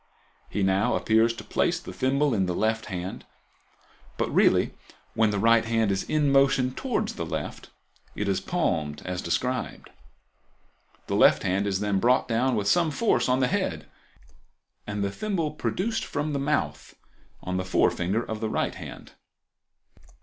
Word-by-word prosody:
He 100 - -1
now 95 +2 +2
appears 110 +1 +3
to - - -8
place - - 0
the 90 - -9
thimble 135 +7 +1
in 95 -4 +1
the 90 - -1
left 110 +2 0
hand, 90 -1 -5 0.9
but - - -1
really, - - +3 0.4
when 110 -1 +3
the 105 - -1
right 115 +2 +4
hand 115 -2 +1
is 95 0 0
in 150 -2 +1
motion 135 -2 +3
towards - - -2
the - - -4
left, - - -5 0.5
it 105 - -2
is 95 -1 0
palmed 80 - -1
as 90 0 -3
described. 125 +9 -2 1.1
The - - -2
left - - +5
hand 95 +2 0
is 95 -1 -1
then 105 -2 +1
brought 125 +5 +3
down 125 +2 +1
with 105 -2 -1
some 170 +6 +3
force 140 - +1
on 130 +1 +2
the 125 - +3
head - - -2 1.0
and 105 -1 -2
the 100 - -1
thimble 175 - -2
produced 195 +8 -2
from 150 +1 -3
the 140 - -1
mouth 75 - -2 0.5
on 90 0 -2
the 95 - -1
forefinger 95 +3 +1
of 110 -1 -5
the 110 - -2
right - - -1
hand. - - -10
110 Hz, 165 wpm, -26 LUFS, 95-135 Hz, 1.1 s, left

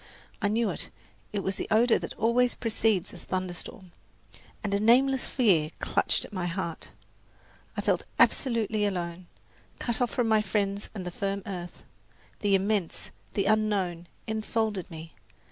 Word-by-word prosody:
I 205 - +3
knew 225 +2 +1
it, - - -4 0.4
it 205 -3 -2
was 190 0 0
the - - -3
odour 225 +2 +5
that - - -6
always 240 +2 +3
precedes 220 -5 +1
a - - -10
thunderstorm, 185 +2 -5 0.7
and 200 -2 -1
a 200 - +3
nameless 255 +4 +4
fear 185 - +3
clutched - - +1
at - - -13
my 180 -2 -1
heart. 170 -2 -4 0.9
I - - +1
felt - - +1
absolutely 225 -5 +3
alone, 175 -3 -2 0.5
cut 235 0 -2
off 245 - +3
from 245 0 0
my 220 -1 +4
friends 200 0 -1
and 190 -3 -5
the 180 - -3
firm 195 +2 -2
earth. 175 -3 -6 0.6
The 205 -2 +3
immense, 195 -2 0 0.2
the 195 - +1
unknown, 200 -5 +1 0.2
enfolded 220 -3 -1
me. 160 -1 -9
205 Hz, 150 wpm, -28 LUFS, 185-225 Hz, 0.9 s, odour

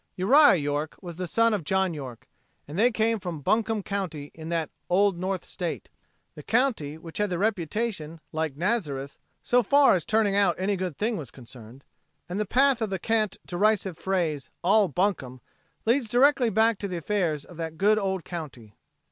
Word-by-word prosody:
Uriah 270 +8 +6
York 145 -1 -2
was 175 -3 -9
the 180 -1 -3
son 230 +5 +2
of 200 -5 -1
John 190 +2 +1
York, 130 -6 -8 0.4
and 145 - -8
they 225 +6 +4
came 225 -1 0
from 175 -5 -6
Buncombe 220 +5 0
county 180 -8 -4
in 160 0 -9
that 165 -2 -2 0.2
"Old 195 +1 +3
North 185 +1 -3
State," 175 -3 -5 0.4
the - - -10
county 215 - 0
which 165 +2 -9
had 210 -2 0
a 175 - -1
reputation 190 -3 -2
like 155 -3 -3
Nazareth 150 - -2 0.2
so 245 0 +3
far 280 +5 +5
as 180 -4 +1
turning 215 -2 +1
out 195 -4 +3
any 195 +2 0
good 185 -5 -4
thing 220 +1 -1
was 145 -8 -7
concerned, 120 0 -13 0.4
and 180 +3 -4
the 210 - -1
path 265 +2 +3
of 220 - 0
the 190 - -2
cant, 215 0 0
derisive 195 0 +1
phrase, 170 -6 -2
"All 200 +3 +4
bunkum," 155 -7 -1 0.5
leads 235 0 +2
directly 255 +1 +4
back 220 0 +2
to 200 - -3
the 180 -2 -4
affairs 170 -4 -1
of 175 - -14
that 160 -1 -5
good 210 +3 +3
old 190 -3 -2
county. 130 - -8
185 Hz, 180 wpm, -26 LUFS, 160-215 Hz, 0.5 s, Uriah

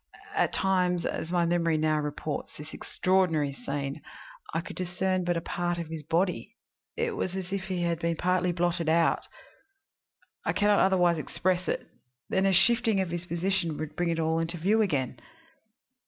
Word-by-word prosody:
At - - +2
times, 180 -2 +1
as 160 - -3
my 175 -1 +2
memory 170 -1 +2
now 155 0 +2
reports 150 0 -4
this 150 +1 -9
extraordinary 170 -7 +1
scene, 140 0 -4 0.5
I 165 - 0
could 170 - -7
discern 185 +1 -1
but 175 -1 0
a - - -2
part 175 +1 -2
of 170 -2 -5
his 160 -1 -5
body; 175 +5 -1 0.4
it 465 -1 -1
was 185 - -2
as 190 0 -4
if 195 -1 -2
he 185 -3 -2
had 170 -1 0
been 170 0 0
partly 180 +1 +1
blotted 175 -1 0
out 165 +1 +2 1.2
I - - 0
can 205 - +2
not 205 - +5
otherwise 180 -3 +4
express 185 +3 -1
it - - -1 0.4
then 190 +1 +2
a - - +4
shifting 225 +3 +4
of 185 -3 -1
his 175 0 -4
position 170 -2 0
would 155 -1 -5
bring 175 0 0
it 165 0 0
all 160 0 +1
into 165 +1 -2
view 205 +7 +3
again. 140 - 0
175 Hz, 180 wpm, -28 LUFS, 160-185 Hz, 1.2 s, not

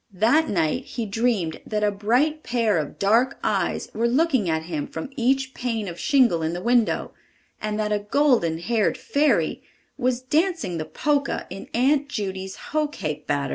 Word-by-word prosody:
That 235 - +3
night 160 -5 0
he 235 - -4
dreamed 205 -6 -1
that 210 -1 -2
a 210 - +3
bright 250 +10 +1
pair 230 - +1
of 150 - -5
dark 230 +7 +2
eves - - 0
were 230 +2 +1
looking 260 - +2
at 160 0 0
him 160 -3 -4
from 160 - -6
each 265 +1 +1
pane 230 -4 -2
of 175 -1 -7
shingle 255 - +3
in 160 +1 -1
the 175 +1 -5
window, 240 -1 +2 0.5
and 215 0 -2
that 210 0 -1
a 210 - +1
golden 210 - +2
haired 210 +6 0
fairy 290 +1 +1 0.4
was 250 0 +1
dancing 305 - 0
the 155 - -3
Polka 290 - 0
in 195 - -8
Aunt 280 +4 +2
Judy's 190 -5 -4 0.2
hoe 305 0 +1
cake 155 - -5
batter. 140 -1 0
225 Hz, 175 wpm, -24 LUFS, 185-265 Hz, 0.5 s, That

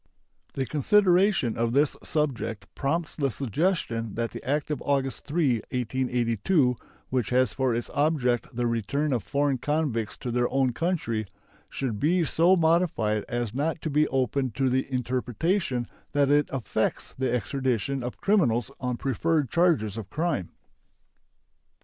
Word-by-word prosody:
The 135 - -1
consideration 180 - +3
of 115 0 0
this 145 +2 +3
subject 120 -9 -2
prompts 160 +3 -1
the 140 -3 0
suggestion 125 - -1
that 115 -2 -2
the - - -8
act 145 +3 -1
of 145 - -2
August 135 -2 -1
3, 145 -5 +2
1882, 125 - +1 0.3
which 125 -5 0
has 125 -3 +2
for 130 -3 +1
its 120 - -4
object 140 -5 +1
the 120 0 0
return 120 +6 0
of 120 - 0
foreign 140 0 0
convicts 145 -7 -1
to 125 - -4
their 120 0 +1
own 130 -1 +2
country, 115 - -1 0.4
should 120 -7 -3
be 170 - +2
so 170 +5 +4
modified 160 - +2
as 120 -3 -2
not 155 +5 -1
to 155 - -2
be 150 +2 +3
open 130 0 0
to 135 -1 +1
the 130 +2 0
interpretation 125 - -1 0.3
that 145 -1 +3
it 145 0 +3
affects 130 -4 -2
the 130 0 -1
extradition 130 +1 -1
of 125 0 -5
criminals 135 - +2
on 125 -2 -2
preferred 145 +2 0
charges 155 - +2
of 110 -3 -6
crime. 155 - -1
130 Hz, 145 wpm, -26 LUFS, 120-150 Hz, 0.4 s, so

